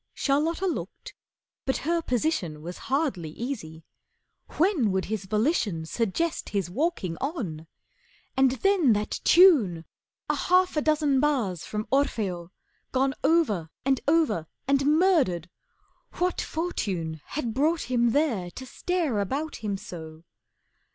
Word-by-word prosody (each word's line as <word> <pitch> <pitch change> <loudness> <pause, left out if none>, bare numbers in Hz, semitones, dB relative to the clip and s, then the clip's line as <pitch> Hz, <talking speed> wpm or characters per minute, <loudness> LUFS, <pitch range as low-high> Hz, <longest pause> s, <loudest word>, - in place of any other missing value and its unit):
Charlotta 310 +6 +1
looked, 360 - -4 0.5
but 265 - 0
her 335 +1 +1
position 240 - -1
Was 175 +2 -7
hardly 260 - 0
easy. 165 - -6 0.7
When 315 - +3
would 190 0 0
his 210 -1 -3
volition 210 - 0
Suggest 235 - -1
his 195 -4 -2
walking 240 - -1
on? 200 - -4 0.7
And 265 0 +5
then 380 - +4
that 210 0 -2
tune! 250 - +5 0.4
A - - +1
half 365 0 +2
a 300 - +2
dozen 300 -3 +2
bars 245 - 0
from 210 0 -3
'Orfeo' 205 -11 0 0.4
Gone 270 +1 +1
over 215 - +2 0.2
and 270 -2 +2
over, 300 - +2 0.2
and 275 0 +2
murdered. 295 - +3 0.6
What 360 +1 0
Fortune 185 - -3
Had 245 -6 -3
brought 310 +6 +1
him 240 -2 +2
there 230 - +1
to 260 +8 -9
stare 315 - -1
about 280 +10 -2
him 205 -3 -3
so? 160 -3 -9
255 Hz, 125 wpm, -26 LUFS, -, 0.7 s, And